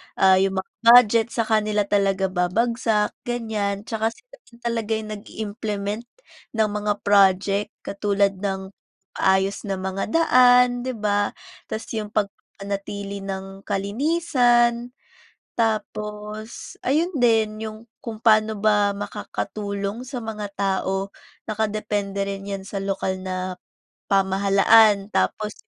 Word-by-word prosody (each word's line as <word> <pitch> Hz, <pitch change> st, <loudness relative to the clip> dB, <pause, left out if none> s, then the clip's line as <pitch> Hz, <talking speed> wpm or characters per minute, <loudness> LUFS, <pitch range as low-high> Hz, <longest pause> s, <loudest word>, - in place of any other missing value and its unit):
Ah, 190 Hz, -1 st, +5 dB
yung 195 Hz, 0 st, +1 dB
mga -, -, -47 dB, 0.2 s
budget 230 Hz, -2 st, +6 dB
sa 230 Hz, -, +2 dB
kanila 215 Hz, -1 st, +1 dB
talaga 195 Hz, -2 st, +1 dB
babagsak, 215 Hz, +4 st, +1 dB, 0.2 s
ganiyan 215 Hz, -4 st, -2 dB
tsaka 220 Hz, 0 st, -1 dB
sila -, -, -19 dB
din 235 Hz, -, -18 dB
talaga 230 Hz, -2 st, -2 dB
yung 220 Hz, -1 st, -5 dB
nag-i-implement 210 Hz, 0 st, -4 dB, 0.5 s
ng 215 Hz, -1 st, +3 dB
mga 210 Hz, 0 st, 0 dB
project 200 Hz, 0 st, +3 dB, 0.2 s
katulad 200 Hz, 0 st, +1 dB
ng 190 Hz, -1 st, -3 dB, 0.4 s
paayos 190 Hz, +1 st, +1 dB
na 195 Hz, -2 st, -3 dB
mga 190 Hz, +1 st, -3 dB
daan, 250 Hz, -5 st, +5 dB
'di 255 Hz, -, -3 dB
ba? 205 Hz, -1 st, +1 dB, 0.4 s
Tapos 220 Hz, -, -4 dB
yung 215 Hz, -2 st, -3 dB
pagpapanatili 200 Hz, -1 st, -4 dB
ng 195 Hz, 0 st, -6 dB
kalinisan. 240 Hz, -, +1 dB, 0.7 s
Tapos 215 Hz, -1 st, -3 dB
ayun 320 Hz, +7 st, +1 dB
din, 220 Hz, -3 st, +2 dB
yung 215 Hz, 0 st, -6 dB, 0.3 s
kung 225 Hz, -2 st, -6 dB
paano 215 Hz, -2 st, +3 dB
ba 205 Hz, -1 st, +3 dB
makakatulong 205 Hz, +1 st, -4 dB
sa 255 Hz, 0 st, -6 dB
mga 220 Hz, -2 st, -5 dB
tao, 195 Hz, 0 st, -1 dB, 0.4 s
naka-depende 210 Hz, -2 st, -2 dB
rin 195 Hz, 0 st, -5 dB
'yan 195 Hz, -1 st, -5 dB
sa 205 Hz, -, -5 dB
lokal 190 Hz, -1 st, -2 dB
na 185 Hz, 0 st, -3 dB, 0.6 s
pamahalaan 195 Hz, +2 st, +4 dB
tapos 210 Hz, -1 st, 0 dB
210 Hz, 115 wpm, -23 LUFS, 195-225 Hz, 0.7 s, budget